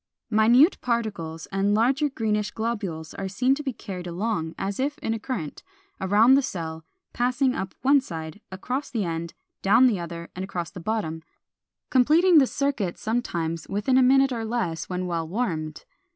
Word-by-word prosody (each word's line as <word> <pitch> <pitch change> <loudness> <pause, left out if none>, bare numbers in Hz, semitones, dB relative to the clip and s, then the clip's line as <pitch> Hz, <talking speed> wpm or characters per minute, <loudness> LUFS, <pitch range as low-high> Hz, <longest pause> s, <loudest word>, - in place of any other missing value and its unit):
Minute 235 - +5
particles 205 -10 -2
and 195 +1 +1
larger 265 +6 +2
greenish 210 -5 -1
globules 205 -9 -4
are 195 - -4
seen 250 +8 +2
to 285 - -3
be 280 -2 -2
carried 185 -5 -7
along, 170 -3 -2
as 195 +3 -3
if 290 +3 -1
in 260 -7 -2
a 225 - -3
current, 205 - -5 0.4
around 210 +6 +5
the 275 - +6
cell, 165 -10 -5 0.3
passing 250 +2 +1
up 190 -5 -5
one 280 +1 +5
side, 165 - -7
across 250 +9 -4
the 220 -6 -1
end, 165 0 -4 0.3
down 230 +6 +5
the 225 -7 +3
other 170 0 -7
and 185 - -4
across 175 -3 -4
the - - -9
bottom, 165 -5 -2 0.7
completing 315 +7 +5
the 265 - +4
circuit 260 -12 -1
sometimes 170 -8 -2
within 210 +6 +1
a 260 - +6
minute 270 +1 +5
or 230 -2 -2
less 220 -8 -2
when 185 0 -2
well 165 -2 -2
warmed. 160 -7 -3
210 Hz, 170 wpm, -25 LUFS, 170-255 Hz, 0.7 s, the